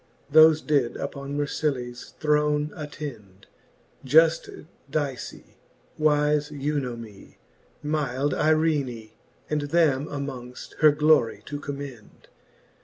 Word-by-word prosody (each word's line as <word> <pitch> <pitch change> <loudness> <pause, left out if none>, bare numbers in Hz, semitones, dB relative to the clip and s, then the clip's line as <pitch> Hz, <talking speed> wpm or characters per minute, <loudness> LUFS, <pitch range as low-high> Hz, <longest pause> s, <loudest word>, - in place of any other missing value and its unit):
Thofe 155 0 +7
did 140 -6 +1
upon 140 0 -5
Mercillaes 135 -4 -3
throne 150 0 +1
attend: 135 -11 -8 0.6
Juft 160 +3 +3 0.3
Dice^ 145 -4 -3 0.6
wife 150 -1 +2
Eunomie^ 130 -8 -5 0.5
myld 145 -2 -1
Eirene, 150 -8 0 0.4
And 150 -1 -1
them 150 -3 +2
amongft, 135 -4 -7
her 155 -1 +7
glorie 145 -8 +2
to 145 0 -5
commend. 140 -6 -9
145 Hz, 90 wpm, -25 LUFS, 130-150 Hz, 0.6 s, Thofe